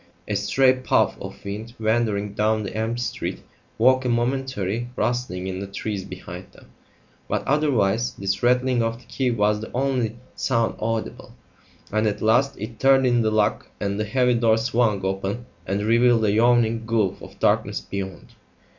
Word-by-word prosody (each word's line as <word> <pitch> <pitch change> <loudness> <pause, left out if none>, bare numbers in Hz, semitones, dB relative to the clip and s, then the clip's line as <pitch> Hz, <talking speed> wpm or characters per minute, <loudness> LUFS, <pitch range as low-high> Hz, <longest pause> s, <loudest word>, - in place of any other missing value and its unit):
A - - -1
stray 130 -1 +3
puff 130 0 +1
of - - -9
wind 110 +4 -6
wandering 110 -2 0
down 110 +1 +1
the 100 - -6
empty 115 +2 -1
street - - -4 0.3
woke 130 +3 +4
a 125 - -1
momentary 120 -3 -1
rustling 120 -7 -1
in 95 0 -4
the 100 - -5
trees 100 0 -4
behind - - -9
them, - - -18 0.6
but - - -2
otherwise 120 -7 +1
this 95 0 -2
rattling 125 0 +3
of 115 0 -1
the 125 - -19
key 130 -2 -1
was 105 -2 +1
the 110 - -7
only 125 -4 0 0.2
sound 115 -3 0
audible; 115 0 -4 0.6
and 110 +1 +1
at 105 0 -1
last 130 +5 +2
it 110 +2 -7
turned 135 0 +5
in 120 -1 +3
the 110 - +2
lock 110 -1 +1
and 100 0 -2
the 105 - 0
heavy 125 +3 +2
door 115 -2 +3
swung 110 -4 +1
open 95 +5 -2 0.2
and 100 +1 -1
revealed 115 +1 +4
a 105 - +3
yawning 115 0 +3
gulf 110 -5 0
of - - -12
darkness - - +1
beyond. 95 -2 -7
115 Hz, 170 wpm, -23 LUFS, 105-125 Hz, 0.6 s, turned